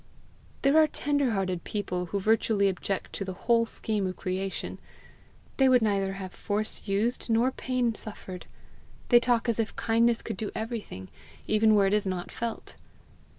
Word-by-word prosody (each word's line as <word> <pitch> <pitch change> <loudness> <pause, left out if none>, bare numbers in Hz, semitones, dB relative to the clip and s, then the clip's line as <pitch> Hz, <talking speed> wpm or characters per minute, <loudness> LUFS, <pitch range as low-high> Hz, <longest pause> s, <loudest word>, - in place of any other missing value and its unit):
There 280 +3 +5
are 310 - +6
tender 285 -3 0
hearted 185 -3 -1
people 180 -4 -3
who 200 +4 -2
virtually 215 0 +2
object 195 0 -3
to - - -3
the 190 -1 -5
whole 230 -1 +4
scheme 210 -3 -1
of 185 - -4
creation; 190 +1 -4 0.8
they 265 -1 +5
would 250 -3 +5
neither 195 -2 +1
have 190 -2 -7
force 215 +1 -2
used 215 +6 0
nor 230 +3 +3
pain 255 -3 -1
suffered; 190 -4 -7 0.6
they 240 - +8
talk 240 0 +1
as 235 -1 0
if 225 - -1
kindness 230 +1 +2
could - - -5
do 215 - -3
everything, 220 - -5 0.4
even 215 0 +4
where 200 -1 +4
it 195 - +2
is 210 -2 +2
not 180 -2 -3
felt. 230 -1 -5
215 Hz, 165 wpm, -28 LUFS, 195-235 Hz, 0.8 s, they